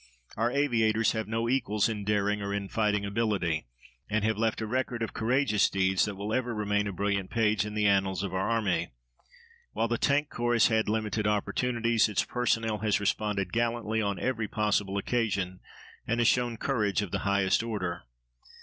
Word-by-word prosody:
Our 115 +2 +1
aviators 115 -5 +2
have 110 -1 -3
no 115 +1 -1
equals 110 -5 +1
in 110 -3 -3
daring 105 0 0
or 100 0 -2
in 100 -1 -4
fighting 105 -2 0
ability, 100 - -1 0.4
and 110 0 0
have 110 0 +1
left 110 +1 0
a 110 - -2
record 120 0 -2
of 115 - -4
courageous 115 -2 +2
deeds 95 -1 +2
that 105 -2 -4
will 100 +3 -4
ever 120 -2 -1
remain 105 -1 0
a - - -2
brilliant 100 0 -1
page 105 -2 +1
in 105 - -7
the 105 -1 +1
annals 95 -2 +2
of 95 - -4
our 95 +3 0
army. 105 - 0 0.8
While 115 +2 0
the 120 +1 -1
Tank 145 +1 +1
Corps 120 0 0
has 115 -1 +5
had 110 -2 +1
limited 110 -1 -1
opportunities, 115 +2 +1
its 105 - 0
personnel 115 -3 0
has 105 -2 +1
responded 100 -2 -1
gallantly 115 -1 0
on 100 -2 -1
every 115 -4 -1
possible 105 -2 0
occasion, 100 -5 -1 0.5
and 115 +1 0
has 120 - +3
shown 120 -2 +2
courage 105 -6 0
of 95 - -7
the - - -1
highest 100 -1 +2
order. 95 -7 -3
105 Hz, 185 wpm, -28 LUFS, 100-115 Hz, 0.8 s, has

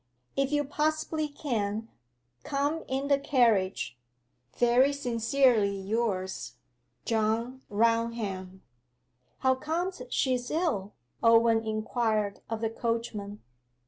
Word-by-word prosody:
If 275 0 +1
you 295 0 +2
possibly 310 +2 -1
can, 225 -7 -2 0.6
come 285 +3 -1
in 270 +1 -1
the 280 -1 +3
carriage. 195 - +2 0.6
Very 245 +4 +4
sincerely 235 -5 +2
yours, 195 -2 -2 0.5
JOHN 230 +3 0
RAUNHAM.' 215 -4 0 0.8
'How 260 -1 +4
comes 325 +5 -3
she 255 0 +1
ill?' 295 - -1 0.3
Owen 230 -1 +5
inquired 215 -1 -1
of 225 -1 -3
the 225 - +1
coachman. 225 -3 -3
230 Hz, 95 wpm, -29 LUFS, 215-275 Hz, 0.8 s, Owen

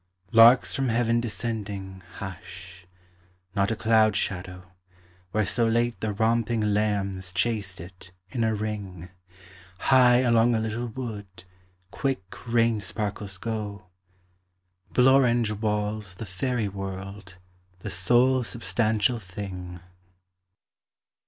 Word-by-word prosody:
Larks 115 +3 +7
from 135 -2 0
heaven 115 0 +2
descending 105 -5 -5
Hush; 90 -1 -9 0.7
not 100 0 +2
a 115 - 0
cloud 110 -1 +3
shadow, 90 -2 -4 0.6
Where 105 +3 0
so 115 +4 +1
late 120 +1 +1
the 110 - -2
romping 110 0 +1
lambs 100 -3 -1
Chased 100 0 -1
it, 90 0 -11 0.2
in 120 - -1
a 110 -1 +1
ring; 100 -4 -5 0.7
High 125 +1 +5
along 120 -1 +4
a - - +1
little 110 +2 -3
wood 110 -6 -7 0.5
Quick 135 -5 -2 0.3
rain 115 -2 +3
sparkles 100 -2 -4
go; 105 -2 -5 1.0
Blorenge 125 -3 +4
walls 105 -2 -2
the 110 - -7
faëry 105 +2 -2
world: 95 0 -7 0.4
the - - -5
sole 125 +8 +3
substantial 115 +1 0
thing. 90 -3 -7
105 Hz, 105 wpm, -26 LUFS, 95-115 Hz, 1.0 s, Larks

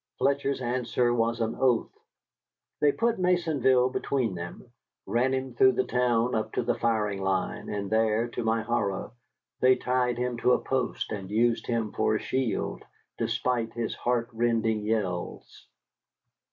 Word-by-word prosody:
Fletcher's 140 0 0
answer 120 0 0
was 115 0 0
an 115 0 -1
oath. 125 -3 +2 0.8
They 145 - +4
put 230 +4 0
Maisonville 150 -9 +3
between 125 -7 -1
them, 85 +7 -8 0.3
ran 125 +3 +1
him 130 -1 -2
through 130 +2 +5
the - - +1
town 125 -1 +1
up 110 - -2
to - - 0
the - - +1
firing 105 -4 0
line, 95 -1 -1
and 100 -1 -3
there, 110 +2 +2
to 120 - -4
my 110 0 +1
horror, 105 -4 -1 0.5
they 130 0 +5
tied 125 -1 0
him 125 -1 -2
to 125 +2 +3
a - - +3
post 130 -4 -2
and 100 -3 -5
used 115 +2 +1
him 115 -3 -1
for 110 - +1
a - - 0
shield, 130 -3 -2 0.4
despite 115 0 -1
his 120 -1 -2
heart 120 -1 -1
rending 115 -2 +1
yells. 95 -6 -3
120 Hz, 155 wpm, -27 LUFS, 110-125 Hz, 0.8 s, through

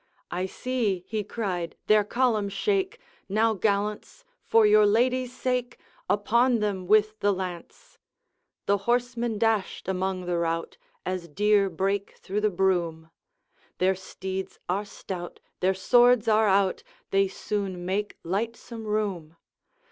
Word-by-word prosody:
I 180 +2 -1
see," 210 -6 -2
he 215 -1 -2
cried, 190 -6 -3
"their 215 -1 +5
column 220 -2 +1
shake. 390 - 0 0.3
Now, 220 +3 +3
gallants! 210 - -2 0.2
for 225 -1 +5
your 210 0 +6
ladies' 250 +4 +2
sake, 250 -1 -1 0.3
Upon 235 +4 +3
them 200 -4 -2
with 215 +1 +3
the 205 0 +3
lance!" 180 -3 -7 0.7
The 200 0 +2
horsemen 240 -2 0
dashed 220 -5 0
among 190 -1 -1
the 175 -1 0
rout, 165 0 -2 0.3
As 185 -2 -3
deer 205 +4 +3
break 195 +3 -2
through 205 +2 -3
the 215 - +3
broom; 175 -4 0 0.7
Their 185 +1 +3
steeds 190 0 -6
are 195 +4 -1
stout, 180 -3 -7 0.2
their 190 +1 +2
swords 245 +3 +4
are 220 0 +4
out, 195 -1 +2 0.3
They 195 0 +3
soon 190 -2 -4
make 205 +3 -2
lightsome 225 +4 -4
room. 190 -7 -2
205 Hz, 130 wpm, -26 LUFS, 185-225 Hz, 0.7 s, your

